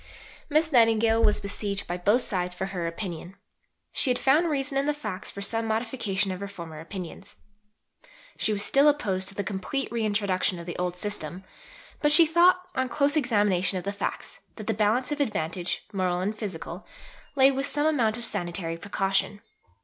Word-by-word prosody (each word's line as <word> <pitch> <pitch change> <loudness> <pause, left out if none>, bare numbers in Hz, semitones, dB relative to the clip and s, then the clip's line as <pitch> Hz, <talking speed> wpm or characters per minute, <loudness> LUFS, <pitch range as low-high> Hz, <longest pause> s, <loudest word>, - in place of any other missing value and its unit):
Miss 310 +2 +2
Nightingale 225 -2 +4
was 210 -2 +4
besieged 200 0 -3
by 175 - -3
both 205 +8 +2
sides 180 -3 -2
for 190 - -3
her 180 -3 -3
opinion. 175 +1 -6 0.6
She - - +1
had 250 - +2
found 305 +7 +3
reason 275 -2 -1
in 275 +1 +1
the 295 - +1
facts 210 -9 -5
for 200 - -6
some 225 +2 0
modification 220 -3 -1
of 185 - -5
her 200 - -5
former 170 -5 -9
opinions. 180 +3 -8 1.0
She - - 0
was 205 -1 0
still 280 +2 +4
opposed 200 -11 +1
to 195 - -7
the 200 - -2
complete 195 +8 -3
reintroduction 205 -5 0
of 170 - -8
the 175 - -5
old 180 0 -1
system, 180 -2 -4 0.6
but 295 - +3
she 330 +2 +9
thought, 345 +3 +4
on 260 0 -1
close 285 +2 +2
examination 205 - +2
of 180 - -4
the 200 - -3
facts, 200 - -5 0.2
that 215 - -8
the 225 - 0
balance 220 +6 +1
of 295 0 -1
advantage, 180 - -2
moral 180 -2 0
and 200 +4 -1
physical, 185 -4 -6 0.5
lay 270 0 +6
with 270 +1 -2
some 290 +1 -1
amount 240 -8 +2
of 240 - -5
sanitary 175 -5 -3
precaution. 195 +2 -1
205 Hz, 180 wpm, -27 LUFS, 185-255 Hz, 1.0 s, she